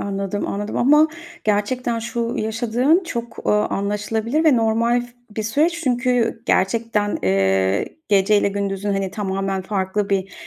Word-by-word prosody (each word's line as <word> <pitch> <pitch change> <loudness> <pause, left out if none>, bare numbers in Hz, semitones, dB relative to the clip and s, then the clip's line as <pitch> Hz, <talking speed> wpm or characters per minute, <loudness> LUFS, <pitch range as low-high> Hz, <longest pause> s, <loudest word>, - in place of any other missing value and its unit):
anladım, 200 0 -3
anladım 205 +1 -4
ama 300 +5 +5 0.4
gerçekten 230 +3 0
şu 235 +1 -3
yaşadığın 240 - +1
çok, 235 -6 -6
ııı, 210 0 +3
anlaşılabilir 215 +8 -1
ve 290 -6 +5
normal 230 +2 +2 0.3
bir 220 - -1
süreç 315 +10 +1
çünkü 245 -2 +1
gerçekten, 210 +1 +1
eee, 95 0 +2 0.2
geceyle 200 0 +3
gündüzün, 200 0 -2
hani, 195 -1 -1
tamamen 195 -1 -2
farklı 195 +1 -2
bir, 195 -1 -1
210 Hz, 125 wpm, -21 LUFS, 195-235 Hz, 0.4 s, ama